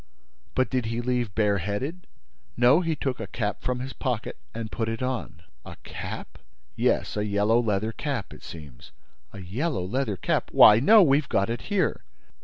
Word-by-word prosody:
"But 130 - +1
did 125 -3 0
he 115 +1 -2
leave 120 -4 -1
bare 105 -2 +2
headed?" 130 - -4 0.5
"No, 125 +6 +6
he 165 -2 -1
took 135 -4 -3
a - - -5
cap 105 -4 -3
from 125 -1 -2
his 130 +1 -6
pocket 125 -5 -3 0.2
and 115 -1 -6
put 115 -1 -2
it 115 +2 -3
on." 125 -9 -4 0.2
"A - - -10
cap?" - - -7 0.4
"Yes, - - +1
a 105 - 0
yellow 105 +3 +2
leather 110 -1 0
cap, 130 -4 -4
it - - -13
seems." 75 -7 -11 0.4
"A 100 - -9
yellow 110 - -2
leather 110 0 -1
cap? - - -1
Why, 105 +1 +8
no, 210 - +7
we've 140 -2 +2
got 100 +3 +1
it 120 - -3
here!" 205 -3 0
115 Hz, 180 wpm, -26 LUFS, 105-130 Hz, 0.5 s, Why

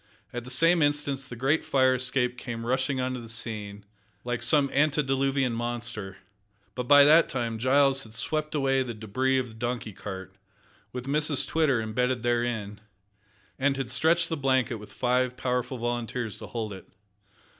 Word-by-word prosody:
At 120 0 -5
the - - -8
same 165 +6 +4
instant 145 -2 +1
the 120 - -7
great 135 +6 +1
fire 130 -1 +3
escape 125 -1 0
came 115 -2 -6
rushing 130 +2 0
on 130 0 -1
the 120 -3 -7
scene, 105 -3 -3 0.4
like 120 -1 -3
some 140 +4 +3
antediluvian 135 -3 +1
monster, 115 -5 -4 0.6
but 125 -1 -4
by 145 +1 +8
that 155 +3 +6
time 115 -3 -3
Giles 135 +2 +3
had 110 -3 -9
swept 155 +6 -1
away 135 -2 +2
the 120 -3 -4
debris 130 +5 0
of 130 -2 -2
the - - -13
donkey 120 -1 -4
cart, 95 -1 -8 0.6
with 125 0 -6
Mrs 145 +1 +2
Twitter 155 -6 +2
imbedded 125 +2 -1
therein, 120 -4 -1 0.8
and 135 0 +1
had 130 -3 -4
stretched 165 +6 +2
the 165 - -2
blanket 130 -4 +1
with 105 0 -12
five 125 0 0
powerful 125 0 -2
volunteers 120 -1 -3
to - - -8
hold 110 -3 -4
it. 95 - -12
125 Hz, 165 wpm, -27 LUFS, 115-135 Hz, 0.8 s, by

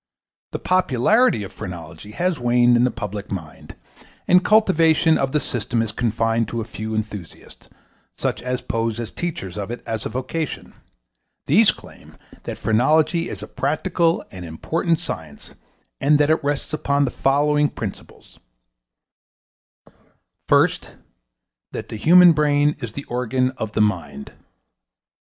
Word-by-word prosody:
The - - -3
popularity 185 - +2
of 95 - -9
phrenology 90 +3 -8
has 175 +2 -1
waned 120 0 +4
in 120 +1 +4
the - - +2
public 105 -2 -6
mind, 80 -6 -8 0.5
and 180 0 +5
cultivation 165 -7 +4
of 135 -2 0
the 150 - +2
system 120 -3 -2
is 110 - -4
confined 115 0 0
to 115 - -4
a 110 - -3
few 110 0 -5
enthusiasts, 105 -5 -7 0.5
such - - -2
as 125 0 -3
pose 115 0 -2
as 115 - -5
teachers 105 - -5
of 100 - -5
it 120 - -6
as 110 -1 -3
a - - -3
vocation. 130 +6 -4 0.7
These - - +5
claim - - -8 0.3
that - - -5
phrenology 155 - +2
is - - -7
a - - -7
practical 165 +4 0
and 90 -1 -9
important 160 - -1
science 80 - -8 0.5
and 145 +2 +4
that 145 +1 +3
it 160 - +1
rests 145 +1 -2
upon 140 -2 +1
the 125 - -2
following 145 +2 +2
principles: 100 -4 -9 2.1
First - - +2 0.8
That - - -6
the - - -6
human 175 +8 +7
brain 150 -1 +2
is 120 -5 -6
the 140 - -6
organ 125 +1 -1
of 110 -5 -6
the 110 - +1
mind. 105 -6 -2
125 Hz, 140 wpm, -21 LUFS, 110-155 Hz, 2.1 s, human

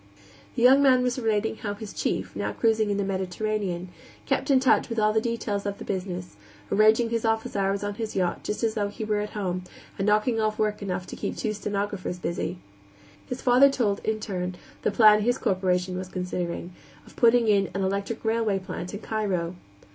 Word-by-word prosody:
The 235 - 0
young 265 +3 +7
man 260 -2 +5
was 250 +1 0
relating 220 -1 0
how 205 -1 -4
his 210 0 -8
chief, - - -2
now - - -2
cruising 220 -2 +2
in 200 - 0
the 200 - 0
Mediterranean, 190 -1 -2 0.4
kept - - 0
in 270 -2 +6
touch 260 -1 +3
with 230 - -4
all 215 -1 +3
the 220 - +2
details 220 -3 -2
of 200 0 -3
the - - -8
business, 180 - -4 0.4
arranging 220 +2 +4
his 230 -1 0
office 225 0 0
hours 195 0 0
on 205 0 -2
his 220 +1 -5
yacht 180 -2 0
just 210 - -3
as 225 -1 +2
though 210 -2 0
he 205 +2 -6
were 210 -1 0
at 210 0 -4
home, 185 -3 -2 0.4
and 195 - 0
"knocking 215 +2 +2
off 215 0 0
work 210 -1 0
enough 185 -2 -3
to - - -8
keep - - -4
two 215 - -1
stenographers 205 -3 -3
busy." 175 +1 -3 0.7
His 250 - -5
father 255 +3 +6
told, 215 -7 0
in 220 0 -1
turn, 185 -4 -3 0.3
the - - +1
plan 210 0 +6
his 245 +4 +1
corporation 185 -2 0
was 185 - -5
considering, 180 -1 -4 0.3
of - - -17
putting 235 -1 +4
in 200 -2 +3
an 195 - 0
electric 200 +4 -2
railway 220 -3 +1
plant 185 0 -6
in 205 - -7
Cairo. 190 -6 -1
210 Hz, 200 wpm, -26 LUFS, 190-225 Hz, 0.7 s, young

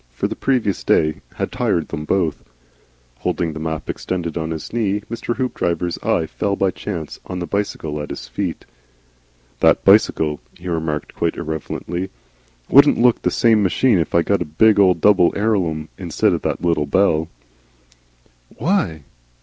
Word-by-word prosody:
For - - -2
the - - -5
previous 120 -8 0
day 75 0 +2
had - - -3
tried 85 - 0
them 75 -2 -5
both. 85 -3 0 0.8
Holding 80 -3 -1
the 80 - -6
map 80 -1 -4
extended 85 -3 -3
on 80 -1 -2
his 80 +4 -6
knee, 105 -3 0
Mr. 115 0 -3
Hoopdriver's 90 -9 -1
eye 80 - 0
fell 100 +5 -2
by 95 -1 +1
chance 85 -6 -6
on 90 - -5
the 90 - -3
bicycle 80 -6 -3
at 75 - -6
his - - -7
feet. - - -4 0.9
"That - - +3
bicycle," 75 -2 +4 0.2
he 90 +1 -10
remarked, 80 -3 -3
quite - - -1
irrelevantly, 85 +4 -4 0.6
"wouldn't 140 +2 +6
look 120 0 +3
the - - +1
same 115 -2 +3
machine 100 +2 +3
if 80 - -2
I 85 - +4
got 100 +2 +1
a - - -1
big, 105 +9 +3 0.2
double 95 -2 +5
Elarum 90 -8 0
instead 85 -4 +1
of - - -2
that - - -3
little 80 -4 +1
bell." 80 -1 +2 1.3
"Why?" 100 - 0
85 Hz, 160 wpm, -20 LUFS, 80-100 Hz, 1.3 s, wouldn't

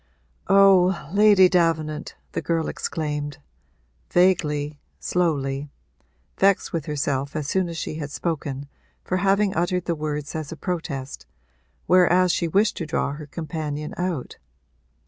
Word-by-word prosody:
'Oh, 190 -4 +5
Lady 205 -2 +7
Davenant!' 160 -4 0 0.2
the - - -3
girl 165 -1 -1
exclaimed, 150 -2 -3 0.7
vaguely, 150 -5 +2 0.2
slowly, 145 -5 -1 0.7
vexed 195 0 +3
with 165 -3 -3
herself 140 -1 -2
as 155 -2 -2
soon 185 +2 0
as 165 - -6
she 155 - -4
had 150 -2 -4
spoken 145 -3 -3 0.4
for 185 - -1
having 195 +1 +2
uttered 175 +2 0
the 170 - 0
words 150 -2 -4
as 155 -2 -5
a - - -5
protest, 145 - -5 0.6
whereas 180 0 +4
she 170 - 0
wished 200 +5 +2
to 165 - -4
draw 145 - -1
her 150 +1 -8
companion 150 -1 -5
out. 175 -7 -3
160 Hz, 130 wpm, -24 LUFS, 150-180 Hz, 0.7 s, Lady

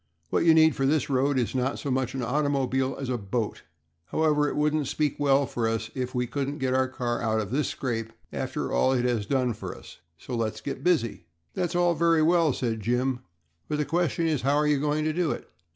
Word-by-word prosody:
What - - +2
you 165 -1 +7
need 160 -1 +5
for 135 - +1
this 145 -1 +1
road 135 +1 +2
is 120 -3 0
not 130 +1 0
so 140 - -3
much 130 0 -1
an 130 - -2
automobile 135 0 0
as 135 - -4
a 125 -1 -1
boat. 105 +2 -3 0.4
However, 150 - +2
it - - -4
wouldn't 150 -1 +1
speak 150 0 -1
well 140 -1 +3
for 120 -3 -2
us 115 0 -2
if 130 -1 -4
we 125 0 +1
couldn't 140 +3 -3
get 130 -2 0
our 130 0 +2
car 120 -2 -3
out 110 -1 +1
of 105 -1 -4
this 145 +3 +1
scrape 115 -4 -3 0.2
after - - -3
all 130 - +3
it 125 -1 +1
has 115 -5 0
done 130 -3 +1
for - - -7
us, - - -14 0.2
so 125 +9 -6
let's 115 -2 -2
get 140 - -6
busy." 145 - +1 0.3
"That's 175 -1 -2
all 175 -1 +3
very 165 0 +3
well," 165 -1 +4
said 115 -3 -2
Jim, 125 +3 0 0.5
"but 150 - -1
the 150 - 0
question 170 0 0
is, 155 -4 +1
how 140 +3 +2
are 150 +1 +2
you 150 -2 +2
going 150 +1 0
to 155 0 0
do 175 -1 0
it? - - -4
135 Hz, 230 wpm, -27 LUFS, 125-150 Hz, 0.5 s, you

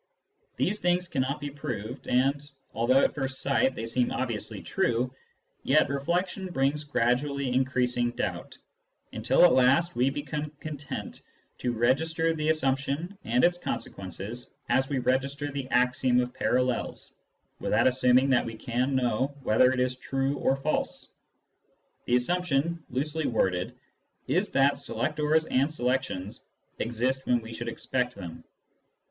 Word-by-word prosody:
These 210 +3 0
things 180 0 +1
cannot 140 -1 -1
be 145 -1 -5
proved; 125 -3 -6
and 135 +3 +2 0.3
although, 130 +4 +3
at - - +2
first 135 -2 -3
sight, 135 -1 +2
they 115 - -4
seem 120 +2 0
obviously - - -3
true, 120 +2 0 0.5
yet - - +3
reflection 175 +7 -1
brings 150 -3 0
gradually 140 0 0
increasing 125 -2 +1
doubt, 120 - -4 0.6
until - - +4
at 175 - +6
last 140 +7 +4
we 125 +2 +3
become 145 +1 -4
content 150 -3 -6 0.4
to 125 - 0
register 160 +8 +1
the 155 -1 -1
assumption 140 +4 0
and 120 +2 +2
its 175 0 +3
consequences, 100 - -6
as 130 0 +2
we 140 - 0
register 135 +3 0
the 135 -2 -5
axiom 125 0 +3
of 125 0 -1
parallels, 125 -1 -1 0.5
without - - +2
assuming 130 +1 +4
that 125 - +4
we 115 - -6
can 125 +4 -1
know 130 +2 0
whether 125 +4 +4
it 130 - -1
is 125 0 0
true 135 +2 -1
or 135 - +2
false. 135 +3 -2 1.0
The 120 - +2
assumption, 165 +3 0
loosely 150 +5 -1
worded, 95 -6 0 0.5
is 180 +10 +1
that 140 +1 +3
selectors 150 +2 0
and 140 +1 +1
selections 125 -8 -2 0.4
exist 125 +3 -1
when 120 -1 +3
we 115 0 -9
should 120 +1 -4
expect 125 +1 -2
them. 85 -2 -8
130 Hz, 140 wpm, -28 LUFS, 125-145 Hz, 1.0 s, at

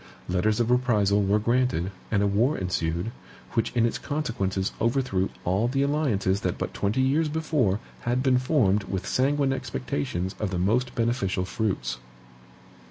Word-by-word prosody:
Letters 105 +5 +1
of 120 0 +1
reprisal 105 -5 +3
were 100 +1 +3
granted, 115 -5 +1 0.2
and 100 -1 +2
a - - +3
war 110 +9 +2
ensued, 90 +1 -1 0.4
which 115 - 0
in 115 -1 +4
its 115 - -1
consequences 115 -11 -2
overthrew 115 -5 +1 0.2
all 95 +6 +2
the 135 +2 +1
alliances 115 -10 +1
that 90 -3 -1
but - - -4
twenty 105 +6 0
years 150 +4 +2
before 150 -10 +1 0.2
had 125 +2 0
been 130 -2 +4
formed 110 -8 +2
with 95 -2 -3
sanguine 135 +1 +1
expectations 85 - -3
of 105 - -1
the 95 - -2
most 115 +8 +1
beneficial 115 -6 0
fruits. 95 - -2
110 Hz, 155 wpm, -26 LUFS, 95-130 Hz, 0.4 s, in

